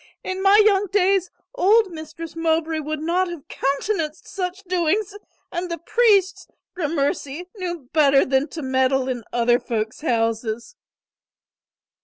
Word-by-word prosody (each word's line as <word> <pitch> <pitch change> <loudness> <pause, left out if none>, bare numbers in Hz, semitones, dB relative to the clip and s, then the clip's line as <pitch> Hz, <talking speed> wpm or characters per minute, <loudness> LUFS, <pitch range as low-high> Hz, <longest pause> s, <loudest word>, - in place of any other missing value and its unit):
In 375 0 -4
my 395 +2 +6
young 405 -1 +3
days 385 -1 +2 0.2
old 435 -2 +3
Mistress 315 0 -8
Mowbray 325 -1 0
would 305 0 -4
not 350 +4 +1
have 345 -5 -8
countenanced 305 +3 -2
such 380 -1 -4
doings 370 +3 0 0.4
and 355 +1 -3
the 335 - -3
priests, 395 +1 +2 0.3
gramercy, 295 -1 -2
knew 345 -7 -5
better 280 -3 +5
than 265 +2 +1
to 320 -2 -7
meddle 260 0 +1
in 245 -3 -3
other 240 0 +3
folk's 225 -2 -3
houses." 230 - -1
330 Hz, 130 wpm, -22 LUFS, 275-375 Hz, 0.4 s, my